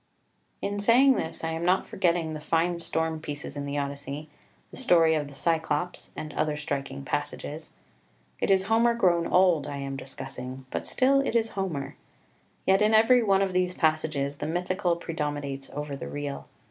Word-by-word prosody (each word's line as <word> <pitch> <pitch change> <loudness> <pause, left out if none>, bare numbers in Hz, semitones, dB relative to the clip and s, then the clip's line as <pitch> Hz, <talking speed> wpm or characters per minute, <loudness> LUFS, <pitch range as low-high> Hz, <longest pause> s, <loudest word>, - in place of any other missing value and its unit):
14 200 - -2
In 205 - -3
saying 245 +6 +6
this 160 - -3
I 165 - -1
am 165 +1 -3
not 180 +2 +3
forgetting 170 -4 0
the 155 - -5
fine 165 +3 0
storm 160 -1 -1
pieces 150 -1 -6
in 140 0 -4
the 140 +1 -3
Odyssey, 140 +1 -4 0.4
the - - -10
story 165 -10 +4
of 150 -2 0
the 145 - -12
Cyclops, 160 +2 -1
and 155 -1 -6
other 150 -1 0
striking 140 - -4
passages. - - -4 0.7
It - - 0
is 190 -1 +4
Homer 230 +3 +3
grown 175 -6 +3
old 180 -6 +4
I 145 -1 -4
am 135 0 -4
discussing, 130 -1 -7
but - - -3
still 275 +1 +3
it 275 -3 -1
is 225 -1 +2
Homer. 160 -10 -4 0.7
Yet 190 +1 +4
in 215 +1 +4
every 230 +3 +6
one 195 -3 +3
of 190 -1 -2
these 180 0 +1
passages 155 -3 0
the 150 - -4
mythical 180 +2 0
predominates 145 -5 -4
over 145 0 -5
the 135 - -6
real. 145 -1 -5
160 Hz, 180 wpm, -27 LUFS, 145-190 Hz, 0.7 s, saying